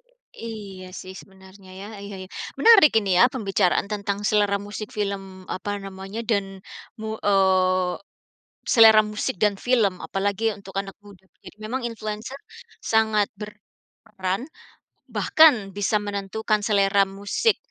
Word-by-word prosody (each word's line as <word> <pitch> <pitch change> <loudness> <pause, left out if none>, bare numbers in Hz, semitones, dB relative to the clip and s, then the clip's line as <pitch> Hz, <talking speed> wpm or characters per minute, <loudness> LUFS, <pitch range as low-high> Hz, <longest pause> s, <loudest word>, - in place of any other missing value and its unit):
I - - -13
iya 195 -4 -9
sih 185 - -9
sebenarnya, 190 0 -17
ya. 200 - -8 0.2
Iya 200 0 -8
iya. - - -15 0.3
Menarik 435 -10 +7
ini 200 -3 -2
ya, 245 - +7
pembicaraan 200 -8 0
tentang 200 -1 -2
selera 205 -1 +2
musik 205 +1 -7
film, 195 -2 -4
apa 205 +2 -4
namanya, 195 +3 -7
dan, 200 -2 +2 0.6
mu 220 0 -5
eee, 185 -2 +2 0.7
selera 220 -3 +7
musik, 210 - -2
dan 205 -1 +3
film. 225 -4 +1
Apalagi 205 +3 -1
untuk 195 -1 -13
anak 195 0 -4
muda, 195 -2 -16 0.2
gitu. - - -12
Memang 245 +4 -3
influencer 215 +2 -6 0.5
sangat 220 -1 +2
berperan, 210 -1 -7 0.7
bahkan 245 -12 +4
bisa 205 +1 +1
menentukan 205 +1 -2
selera 200 -1 +3
musik 200 - 0
205 Hz, 130 wpm, -23 LUFS, 195-220 Hz, 0.7 s, Menarik